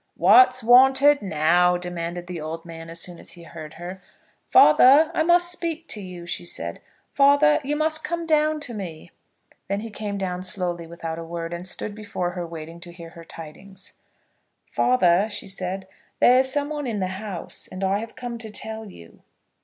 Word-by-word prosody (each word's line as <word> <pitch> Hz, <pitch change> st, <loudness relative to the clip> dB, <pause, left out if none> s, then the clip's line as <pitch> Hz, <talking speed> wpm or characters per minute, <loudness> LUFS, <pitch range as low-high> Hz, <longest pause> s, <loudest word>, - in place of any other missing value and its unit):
"What's 255 Hz, -10 st, +6 dB
wanted 265 Hz, +4 st, +6 dB
now?" 175 Hz, 0 st, +2 dB
demanded 175 Hz, 0 st, -5 dB
the 175 Hz, -2 st, -6 dB
old 165 Hz, +2 st, -6 dB
man 165 Hz, -1 st, -9 dB
as 165 Hz, 0 st, -8 dB
soon 175 Hz, 0 st, -5 dB
as -, -, -6 dB
he 175 Hz, -, -13 dB
heard 160 Hz, -2 st, -10 dB
her. 180 Hz, +3 st, -8 dB, 0.5 s
"Father, 275 Hz, -, +7 dB
I -, -, 0 dB
must 345 Hz, +1 st, +4 dB
speak 335 Hz, -2 st, -3 dB
to 210 Hz, -, -4 dB
you," 180 Hz, -2 st, -9 dB
she 175 Hz, -, -5 dB
said. 175 Hz, -, -4 dB, 0.3 s
"Father, 285 Hz, +2 st, +4 dB
you 290 Hz, +2 st, -1 dB
must 310 Hz, +1 st, 0 dB
come 340 Hz, 0 st, -3 dB
down 310 Hz, -1 st, +2 dB
to 265 Hz, -5 st, -6 dB
me." 175 Hz, -6 st, -8 dB, 0.6 s
Then 200 Hz, +1 st, -2 dB
he 225 Hz, 0 st, -7 dB
came 205 Hz, -1 st, -5 dB
down 180 Hz, -2 st, -3 dB
slowly, 180 Hz, -3 st, -4 dB
without 165 Hz, -1 st, -6 dB
a -, -, -6 dB
word, 165 Hz, 0 st, -6 dB
and 175 Hz, +2 st, -6 dB
stood 205 Hz, +2 st, -4 dB
before 205 Hz, -4 st, -4 dB
her 175 Hz, -1 st, -5 dB
waiting 165 Hz, 0 st, -9 dB
to 175 Hz, 0 st, -10 dB
hear 170 Hz, -1 st, -11 dB
her 170 Hz, 0 st, -12 dB
tidings. 165 Hz, +5 st, -12 dB, 0.7 s
"Father," 200 Hz, -5 st, +2 dB
she 205 Hz, -, -6 dB
said, 190 Hz, 0 st, -5 dB, 0.3 s
"there 250 Hz, +1 st, +6 dB
is 260 Hz, 0 st, +2 dB
some 290 Hz, +1 st, -1 dB
one 295 Hz, -3 st, -4 dB
in 225 Hz, -3 st, -2 dB
the 190 Hz, +1 st, -3 dB
house, 200 Hz, -6 st, -7 dB
and 185 Hz, +1 st, -7 dB
I 195 Hz, +1 st, +1 dB
have 225 Hz, +1 st, -8 dB
come 245 Hz, -2 st, -6 dB
to 225 Hz, -2 st, -7 dB
tell 220 Hz, +1 st, -6 dB
you." 85 Hz, -, -15 dB
190 Hz, 190 wpm, -23 LUFS, 170-255 Hz, 0.7 s, Father